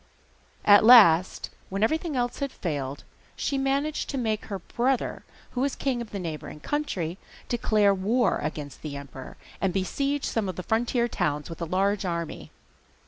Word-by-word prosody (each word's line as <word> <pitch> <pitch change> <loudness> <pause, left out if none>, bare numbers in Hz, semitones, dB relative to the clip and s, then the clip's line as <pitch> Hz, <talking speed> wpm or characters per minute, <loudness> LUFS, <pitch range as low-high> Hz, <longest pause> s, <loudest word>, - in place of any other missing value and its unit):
At 205 0 +8
last, 200 -7 +6 0.2
when 195 +2 -1
everything 315 +5 0
else 245 -1 -1
had 280 -2 -2
failed, 145 - -4 0.3
she 280 - -2
managed 280 +3 -1
to 275 - -3
make 220 -4 -1
her 200 - -4
brother, 245 +7 -1 0.3
who 250 - -2
was 275 0 0
king 260 -3 -1
of 235 - -7
the 205 - -5
neighbouring 155 -4 -6
country, 185 - -3 0.3
declare 215 -4 +3
war 210 +3 +1
against 150 -2 -5
the 150 -2 -6
emperor, 135 -2 -10 0.2
and 195 - +2
besiege 275 +10 -1
some 215 -4 -1
of 185 - -4
the 185 - -5
frontier 235 +3 +1
towns 150 -7 -2
with 165 - -9
a - - 0
large 195 +4 +1
army. 170 -3 -4
205 Hz, 165 wpm, -26 LUFS, 170-250 Hz, 0.3 s, At